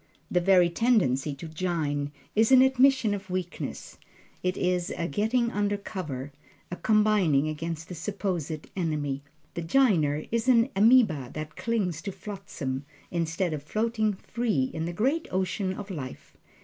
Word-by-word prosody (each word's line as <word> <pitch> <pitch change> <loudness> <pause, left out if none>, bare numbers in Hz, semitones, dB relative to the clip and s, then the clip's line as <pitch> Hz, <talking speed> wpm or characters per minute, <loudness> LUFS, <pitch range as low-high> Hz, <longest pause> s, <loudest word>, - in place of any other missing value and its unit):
The 180 - +3
very 180 -2 +5
tendency 165 - +2
to 150 +4 -8
"jine" 155 -4 -2 0.2
is 220 +3 +4
an 260 -1 +8
admission 265 -4 +4
of 200 -1 -6
weakness 180 -1 -5 0.4
it 185 0 -1
is 180 -1 0
a 170 - -1
getting 225 - +1
under 205 -1 0
cover, 150 -10 -6 0.4
a - - -2
combining 195 -7 +3
against 160 +1 -4
the - - -7
supposed 175 -4 -3
enemy. 150 -6 -1 0.3
The 170 - -4
"jiner" 165 - +2
is 230 +2 0
an 240 0 +5
ameba 205 - +4
that 155 0 -6
clings 195 -9 -1
to 195 +2 -4
flotsam, 185 -9 -5 0.3
instead 170 0 -1
of 150 - -4
floating 215 +5 0
free 190 - -1
in 160 0 -2
the 170 - -3
great 265 - 0
ocean 185 +1 -1
of 205 0 -7
life. 135 -7 -7
180 Hz, 150 wpm, -27 LUFS, 155-215 Hz, 0.4 s, an